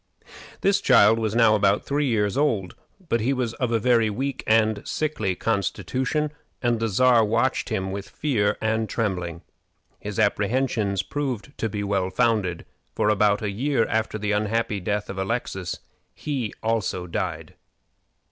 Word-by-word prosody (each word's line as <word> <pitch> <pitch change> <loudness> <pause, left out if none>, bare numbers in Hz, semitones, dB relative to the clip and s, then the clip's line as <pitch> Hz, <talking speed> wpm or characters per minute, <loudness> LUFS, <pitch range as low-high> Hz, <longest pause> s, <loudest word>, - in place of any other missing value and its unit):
This 195 +1 +3
child 115 - +5
was 110 -1 -1
now 115 -2 +5
about 100 -1 +2
three 145 +1 0
years 105 -5 +1
old, 115 -11 0 0.3
but 115 - +1
he 130 +5 +1
was 125 -3 -2
of 125 -1 -2
a 115 - +3
very 115 -1 +3
weak 135 +6 -3
and 110 -1 +3
sickly 110 -12 -2
constitution, 130 - -1 0.3
and 120 -2 +1
the 115 - 0
Czar 120 +3 +4
watched 115 +5 0
him 95 -4 -2
with 100 0 -6
fear 105 -9 0
and 110 0 0
trembling. 90 -7 -2 0.6
His 105 0 -6
apprehensions 105 -1 +1
proved 140 -2 -4
to 115 - -1
be 105 0 -3
well 100 -2 0
founded, 95 -3 0 0.3
for 105 - +2
about 105 0 +2
a 105 - -1
year 125 +3 +1
after 110 -1 -1
the 105 -1 -2
unhappy 105 0 0
death 105 +2 -2
of 95 - -6
Alexis 95 -3 -3 0.4
he 135 -8 -3
also 110 -5 -1
died. 85 - -4
110 Hz, 155 wpm, -24 LUFS, 100-120 Hz, 0.6 s, child